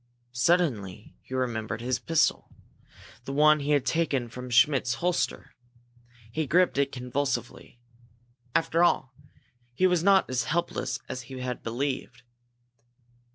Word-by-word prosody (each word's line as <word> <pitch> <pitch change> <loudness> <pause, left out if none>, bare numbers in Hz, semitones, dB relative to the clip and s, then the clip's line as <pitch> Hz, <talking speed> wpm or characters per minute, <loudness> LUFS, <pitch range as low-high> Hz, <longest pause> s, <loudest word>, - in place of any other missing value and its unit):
Suddenly 120 - 0
he 130 - -8
remembered 115 -4 -2
his 125 +1 -1
pistol, 165 -2 +1 0.8
the - - -5
one 150 +2 +5
he 145 +1 -4
had 145 -3 +2
taken 140 -7 0
from 125 +2 -8
Schmidt's 125 -1 +3
holster. 170 -9 -2 0.8
He 155 +4 -2
gripped 175 0 +3
it 140 -1 +1
convulsively. 125 -1 -4 0.8
After 165 +1 +2
all, 135 -6 +2 0.6
he 185 - +2
was 180 -2 +3
not 195 0 +5
as 130 -1 -1
helpless 150 -5 -2
as 130 - -5
he 130 - -7
had 125 -1 -4
believed. 125 0 -4
130 Hz, 125 wpm, -27 LUFS, 125-160 Hz, 0.8 s, one